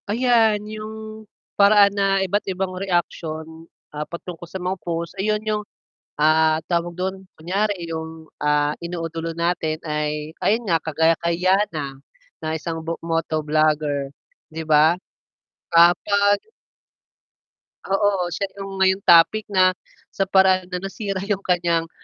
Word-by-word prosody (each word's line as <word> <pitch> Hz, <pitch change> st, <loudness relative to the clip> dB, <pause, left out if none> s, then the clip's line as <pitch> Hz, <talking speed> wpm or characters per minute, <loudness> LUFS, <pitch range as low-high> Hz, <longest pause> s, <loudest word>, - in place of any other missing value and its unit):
Ayan 225 Hz, -2 st, +3 dB
yung, 215 Hz, 0 st, -8 dB, 0.3 s
paraan 200 Hz, 0 st, +6 dB
na 195 Hz, -1 st, +1 dB
iba't 200 Hz, +3 st, 0 dB
ibang 185 Hz, 0 st, -2 dB
reaction 165 Hz, -3 st, -3 dB, 0.2 s
ah, 150 Hz, -, -5 dB
patungkol 170 Hz, 0 st, -8 dB
sa 190 Hz, -, -5 dB
mga 180 Hz, 0 st, -2 dB
post 170 Hz, 0 st, -4 dB
ayun 210 Hz, +1 st, +1 dB
yung 210 Hz, -1 st, -1 dB, 0.5 s
ah, 155 Hz, +1 st, +3 dB
tawag 170 Hz, 0 st, 0 dB
dun? 190 Hz, +2 st, -4 dB
Kunyari 185 Hz, +1 st, -2 dB
yung 160 Hz, 0 st, -7 dB
ah, 150 Hz, 0 st, +1 dB
iniidulo 165 Hz, -1 st, -5 dB
natin 165 Hz, -2 st, -1 dB
ay 150 Hz, 0 st, -3 dB
ayun 220 Hz, -1 st, 0 dB
nga, 165 Hz, -, +4 dB
kagaya 160 Hz, +1 st, +1 dB
kay 170 Hz, +1 st, -2 dB
Yannah 170 Hz, -8 st, 0 dB, 0.4 s
na -, -, -8 dB
ng 155 Hz, -, -1 dB
isang 165 Hz, +1 st, -4 dB, 0.2 s
moto 165 Hz, -1 st, -1 dB
vlogger 150 Hz, -2 st, 0 dB, 0.4 s
'di 160 Hz, -, -4 dB
ba? 155 Hz, +1 st, +4 dB, 0.8 s
Ah, 170 Hz, +1 st, +8 dB
'pag 200 Hz, +1 st, +1 dB, 1.5 s
Oo, 195 Hz, -2 st, +1 dB
siya 185 Hz, +4 st, -2 dB, 0.2 s
yung 195 Hz, 0 st, -6 dB
ngayong 190 Hz, 0 st, +3 dB
topic 175 Hz, +5 st, +5 dB
na 185 Hz, -2 st, +4 dB, 0.4 s
sa 195 Hz, -1 st, -1 dB
paraan 190 Hz, -1 st, +4 dB
na 180 Hz, -, -3 dB
nasira 195 Hz, +1 st, -4 dB
yung 200 Hz, -1 st, -1 dB
kanyang 170 Hz, -3 st, 0 dB
175 Hz, 135 wpm, -22 LUFS, 160-195 Hz, 1.5 s, Ah